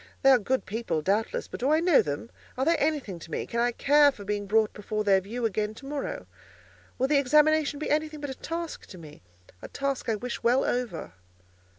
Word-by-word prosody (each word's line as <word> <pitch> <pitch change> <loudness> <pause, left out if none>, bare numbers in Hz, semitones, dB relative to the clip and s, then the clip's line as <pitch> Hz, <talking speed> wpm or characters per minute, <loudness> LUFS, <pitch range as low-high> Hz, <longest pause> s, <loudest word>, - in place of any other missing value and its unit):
They 270 - +7
are 255 - +6
good 260 +5 -1
people, 190 -7 -2
doubtless, 205 +6 0
but - - -8
do 260 - 0
I 310 +1 +4
know 340 -3 +5
them? 145 +10 -5 0.3
Are 265 - 0
they 335 +2 +4
anything 280 - -1
to 165 - -12
me? - - -3
Can 235 - -3
I 240 +1 +2
care 290 +4 +4
for 210 -7 -11
being 205 0 -2
brought 215 +1 +2
before 215 +1 -3
their 195 -2 +4
view 230 +5 -4
again 215 0 -1
to 270 - -12
morrow? 295 - -4 0.7
Will 260 - +1
the 290 0 +4
examination 300 +2 +3
be 305 - -3
anything 305 0 0
but 290 -2 -5
a - - -4
task 330 +4 -6
to 185 - -11
me—a 90 - -14
task 275 -3 -3
I 225 - +2
wish 240 +3 -5
well 245 +3 +3
over?" 235 - -3
245 Hz, 215 wpm, -27 LUFS, 205-290 Hz, 0.7 s, They